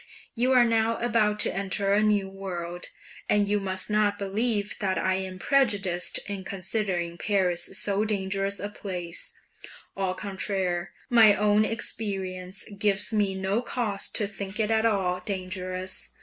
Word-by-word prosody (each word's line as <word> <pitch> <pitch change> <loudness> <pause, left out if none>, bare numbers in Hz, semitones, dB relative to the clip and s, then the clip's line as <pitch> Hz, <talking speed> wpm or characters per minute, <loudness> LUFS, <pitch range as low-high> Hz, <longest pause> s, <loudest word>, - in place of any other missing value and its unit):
You 250 +2 +1
are 250 -1 +6
now 230 0 +2
about 220 -3 +2
to - - +2
enter 195 +1 0
a 205 - +4
new 210 -2 +2
world, 180 -3 -5 0.4
and 205 -1 +3
you 205 +1 +1
must 190 -1 -1
not 210 -1 +2
believe 205 +1 -1
that 190 -2 0
I 190 - +1
am 190 0 -3
prejudiced 205 -8 +2
in 200 -2 -5
considering 185 -3 -2
Paris 190 -2 +1
so 205 0 +2
dangerous 195 -1 -1
a 205 - -3
place; 180 -5 -4 0.6
au 190 -1 -1
contraire, 190 -3 -2 0.2
my 220 -4 +7
own 210 +1 +3
experience 190 -4 -2
gives 205 +1 +1
me 205 -3 +1
no 190 +4 0
cause 225 -5 -2
to 210 - +4
think 200 +1 -5
it 220 0 +1
at 220 0 +3
all 185 -4 0
dangerous. 185 -1 -2
200 Hz, 150 wpm, -27 LUFS, 190-210 Hz, 0.6 s, my